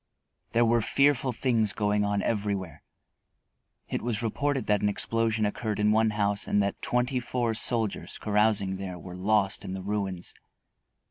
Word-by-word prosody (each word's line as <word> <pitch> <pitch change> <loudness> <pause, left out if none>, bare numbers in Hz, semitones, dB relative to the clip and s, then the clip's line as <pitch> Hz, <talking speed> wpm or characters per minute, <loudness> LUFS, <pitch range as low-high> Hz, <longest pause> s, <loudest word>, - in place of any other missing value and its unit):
There 120 +1 +4
were 115 0 +3
fearful 140 +2 +2
things 115 -4 +1
going 105 -1 +1
on 100 0 0
everywhere. 100 -8 -2 1.1
It - - -3
was 115 -1 -2
reported 135 +4 -1
that 105 -1 +2
an 105 - +2
explosion 115 +1 0
occurred 105 0 -2
in 105 0 +3
one 110 +1 +3
house 105 -1 0
and 105 - +2
that 100 - -3
twenty 125 +1 0
four 120 -2 -1
soldiers, 110 -1 +1
carousing 105 -2 +1
there, 95 -2 -6
were 90 +1 -10
lost 100 +1 +1
in 95 - -5
the 95 -1 -5
ruins. 100 -3 -3
105 Hz, 155 wpm, -27 LUFS, 100-115 Hz, 1.1 s, There